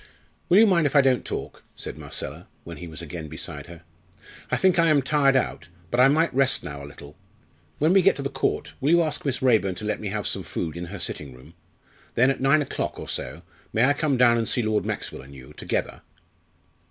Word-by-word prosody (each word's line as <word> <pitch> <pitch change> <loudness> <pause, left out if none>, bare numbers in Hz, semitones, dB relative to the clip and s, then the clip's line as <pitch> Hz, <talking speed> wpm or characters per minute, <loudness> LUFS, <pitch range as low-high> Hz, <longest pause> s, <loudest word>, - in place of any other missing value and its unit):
"Will 180 - +6
you 220 - +8
mind 170 -7 +3
if 145 - -5
I 140 - +8
don't 130 -2 +2
talk?" - - -6
said - - -7
Marcella, - - -7 0.2
when 85 -2 -9
he 90 - -8
was 80 +1 -7
again 80 0 -7
beside 75 -1 -6
her. 85 -1 -12 0.7
"I - - +1
think 185 -2 +3
I 165 - +5
am 150 -3 +4
tired 140 -1 +3
out, 85 -10 -1 0.2
but 120 - 0
I 130 - +8
might 155 +3 +2
rest 135 0 +2
now 70 -1 -7
a - - -8
little. 70 0 -13 0.6
When 155 +4 +3
we 195 - +6
get 195 - +4
to 140 - -5
the 140 - -2
Court, - - -2
will 140 - +1
you 170 +1 +5
ask 155 -2 -2
Miss 130 -2 -1
Raeburn 110 -7 +3
to 105 - -6
let 105 - -1
me 105 - -5
have 105 -1 -3
some - - -1
food 80 -2 -4
in 85 +1 -5
her 100 +4 -7
sitting 70 -7 -5
room? 65 - -16 0.6
Then, 130 +3 +4
at 135 - -4
nine 140 +3 +4
o'clock - - -4
or - - -7
so, 75 +8 -5 0.3
may 110 +3 +4
I 145 - +4
come 145 -2 0
down 120 -1 +5
and 115 - -1
see 120 - 0
Lord 110 -1 0
Maxwell - - -4
and 70 +1 -14
you 65 -1 -13
together?" - - -3
120 Hz, 235 wpm, -25 LUFS, -, 0.7 s, you